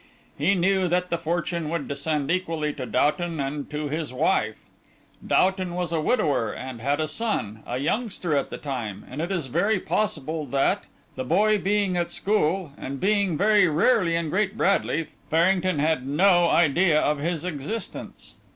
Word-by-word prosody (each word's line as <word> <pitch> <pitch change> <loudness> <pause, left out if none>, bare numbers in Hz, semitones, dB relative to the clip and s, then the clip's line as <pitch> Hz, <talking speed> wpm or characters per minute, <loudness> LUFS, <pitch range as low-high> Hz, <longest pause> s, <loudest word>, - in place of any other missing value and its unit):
He 175 +8 +2
knew 185 +1 +2
that 180 +1 0
the 170 - 0
fortune 170 -1 -2
would 165 -3 -3
descend 145 +1 -2
equally 165 -4 -1
to 130 -2 -6
Doughton 165 +2 0
and 140 +1 -3
to 150 0 -3
his 155 -1 -3
wife. 130 - +1 0.7
Doughton 185 -2 +2
was 175 -2 -2
a 165 -2 0
widower 145 - +1
and 130 -3 -7
had 140 +4 0
a 155 - 0
son, 155 - -2
a 120 - -2
youngster 180 - -1
at 140 - 0
the - - -6
time, 115 -8 -5
and 135 +5 -5
it 170 +4 -3
is 175 -6 -1
very 185 - +1
possible 160 -7 -2
that, 135 +2 0 0.3
the - - -3
boy 210 +10 +3
being 200 -2 +1
at 175 -1 0
school, 190 -5 0
and 135 +1 -5
being 200 -4 +1
very 205 -1 +4
rarely 170 +2 +3
in 165 -2 -1
Great 205 +2 0
Bradley, 190 -6 +1 0.2
Farrington 180 +1 +2
had 150 -3 0
no 175 +3 +4
idea 165 0 +4
of 150 -1 +1
his 165 +2 -2
existence. 180 +7 -6
165 Hz, 170 wpm, -25 LUFS, 145-185 Hz, 0.7 s, very